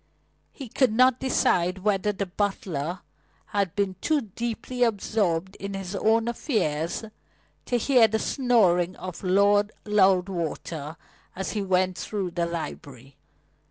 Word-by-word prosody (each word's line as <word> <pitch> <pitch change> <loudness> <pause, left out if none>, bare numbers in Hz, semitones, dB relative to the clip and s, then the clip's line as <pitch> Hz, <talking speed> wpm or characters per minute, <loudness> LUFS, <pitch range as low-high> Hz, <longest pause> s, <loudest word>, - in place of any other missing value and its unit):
He 270 - -9
could 250 +1 +2
not 255 +2 +4
decide 185 -8 +1
whether 210 0 +1
the 200 0 -3
butler 180 -4 -3 0.4
had 200 -3 -1
been 200 -3 -1
too 310 -2 +2
deeply 235 +3 -5
absorbed 200 -5 0
in 200 0 -5
his 195 0 -5
own 225 +3 +2
affairs 215 - -1 0.6
to 245 - +1
hear 240 -1 +5
the 220 0 0
snoring 195 -9 +2
of 185 0 -8
Lord 200 +2 +3
Loudwater 180 -6 0 0.4
as 190 +1 -3
he 210 - -2
went 185 -1 +1
through 195 -4 -3
the 170 0 -1
library. 140 -6 -7
195 Hz, 125 wpm, -26 LUFS, 180-220 Hz, 0.6 s, hear